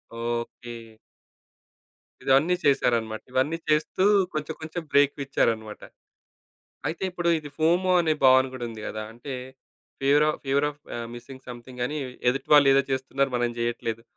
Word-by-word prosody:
Okay. 120 +1 -4 1.5
ఇవన్నీ 145 +7 +4
చేశారన్నమాట. 120 -6 +1
ఇవన్నీ 130 +6 +1
చేస్తూ 155 +4 +1 0.3
కొంచెం 155 +1 -3
కొంచెం 160 +2 -5
బ్రేకులు 140 0 +3
ఇచ్చారన్నమాట. 110 -5 -1 1.1
అయితే 165 - -5
ఇప్పుడు 175 -1 -2
ఇది 150 -2 -9
ఫోమో 175 +4 +2
అనే 160 -2 +2
భావన 130 0 +7
గూడా 130 -2 -5
ఉంది 110 -2 -9
గదా! 110 - -5
అంటే 120 +4 -8 0.7
ఫివర్‌ 145 +2 +4
ఆఫ్ - - -4
ఫివర్‌ 140 +2 +2
ఆఫ్‌ 145 0 -17 0.2
ఆహ్, 115 -1 -5
మిస్సింగ్‌ 130 +2 -11
సమ్‌థింగని 125 +3 -5 0.3
ఎదుటివాళ్ళు 135 +2 +4
ఏదో 140 0 +4
చేస్తున్నారు, 135 +1 0
మనం 120 0 +1
జెయ్యట్లేదు. 115 -1 -2
135 Hz, 130 wpm, -26 LUFS, 120-150 Hz, 1.5 s, భావన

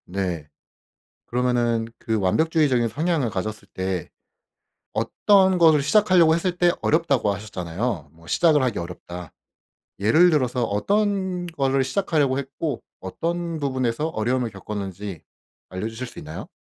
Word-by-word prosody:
네. 90 -5 -3 0.8
그러면은 120 -2 +1
그 110 -1 -1
완벽주의적인 130 - +2
성향을 150 - 0
가졌을 105 +1 -4
때 95 -2 -3 0.8
어떤 190 - +3
것을 160 -4 +6
시작하려고 175 0 +5
했을 175 +1 -1
때 175 -1 +5
어렵다고 145 -10 +2
하셨잖아요. 95 - -4
뭐 85 0 -19
시작을 155 - +3
하기 125 -4 -1
어렵다. 85 0 -7 0.7
예를 135 - +5
들어서 130 -6 +1
어떤 190 - 0
거를 135 -5 +1
시작하려고 150 -5 +1
했고, 140 +2 -4 0.2
어떤 170 - -3
부분에서 130 0 -1
어려움을 120 -1 -1
겪었는지 100 -2 -6 0.5
알려주실 110 +7 -5
수 - - -10
있나요? 80 +2 -8
125 Hz, 315 characters per minute, -23 LUFS, 100-160 Hz, 0.8 s, 것을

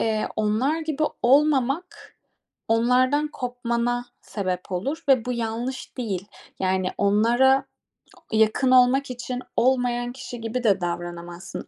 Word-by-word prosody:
eee, 220 -1 0
onlar 225 +9 +1
gibi 310 -1 -3 0.2
olmamak, 280 +5 +1 0.5
onlardan 255 +6 +3
kopmana 245 -2 -2 0.2
sebep 185 -2 -4
olur 275 - -3
ve 255 -4 +4
bu 250 - -2
yanlış 235 +2 -4
değil. 200 -5 -3 0.3
Yani 185 0 +1
onlara 235 +7 +3 0.7
yakın 220 +4 +3
olmak 255 +1 +4
için 250 +1 -5 0.2
olmayan 245 -1 +1
kişi 245 -2 -8
gibi 230 +2 -3
de 200 -5 +3
davranamazsın 175 +1 -5
245 Hz, 115 wpm, -24 LUFS, 215-260 Hz, 0.7 s, ve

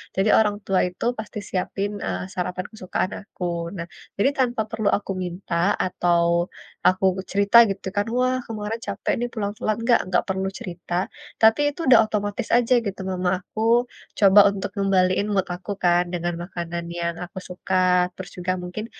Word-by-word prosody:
jadi 195 +3 +2
orang 210 -2 +2
tua 190 -1 +2
itu 180 +4 -6
pasti 215 -1 -6
siapin, 195 +2 -2 0.2
eee, - - -2
sarapan 180 0 -3
kesukaan 185 -3 -3
aku. 200 -2 -10 0.3
Nah, 170 -1 -5 0.3
jadi 205 +7 +3
tanpa 245 -3 +1
perlu 220 -2 -1
aku 200 - -6
minta, 175 0 -5 0.3
atau, 175 -2 +2 0.6
aku 185 +1 +3 0.3
cerita 200 +3 +4
gitu 195 0 -4
kan, 205 0 +1
"Wah, 255 0 +2
kemarin 220 0 -4
capek 200 0 -1
nih, 240 - -1
pulang-pulang." 210 0 -2
Enggak, 235 0 +4
enggak 180 -1 +2
perlu 190 0 -1
cerita. 175 -1 -7 0.5
Tapi 225 +4 +6
itu - - -18
udah 250 -3 +8
otomatis 205 0 -2
aja 245 +1 +2
gitu, 195 -1 -4
mama 180 -1 0
aku 215 - -6 0.6
coba 200 0 +7
untuk 200 -1 -4
ngembaliin 195 0 +2
mood 195 -1 +2
aku 180 +3 -7
kan, 175 0 +4
dengan 175 0 -1
makanan 170 -1 -5 0.2
yang 170 0 -1
aku 180 - -16
suka. 180 +1 -3 0.4
Terus 185 - -8
juga 180 +1 -1
mungkin 180 +5 -5
195 Hz, 165 wpm, -23 LUFS, 180-215 Hz, 0.6 s, udah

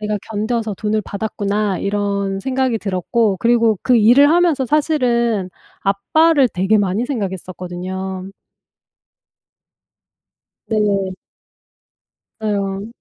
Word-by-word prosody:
'내가 210 0 -2
견뎌서 220 0 -2
돈을 215 +1 -1
받았구나.' 205 -1 -2
이런 200 -1 -1
생각이 260 0 0
들었고 200 +2 0
그리고 230 -3 +3
그 250 - +3
일을 245 +7 +6
하면서 335 -5 +3
사실은 235 - +1 0.3
아빠를 275 +8 +3
되게 195 +3 +1
많이 200 +4 0
생각했었거든요. 190 -3 -5 2.4
네. 200 -3 0 1.3
네 215 -1 -1
어. 195 +1 -3
210 Hz, 220 characters per minute, -18 LUFS, 195-235 Hz, 2.4 s, 일을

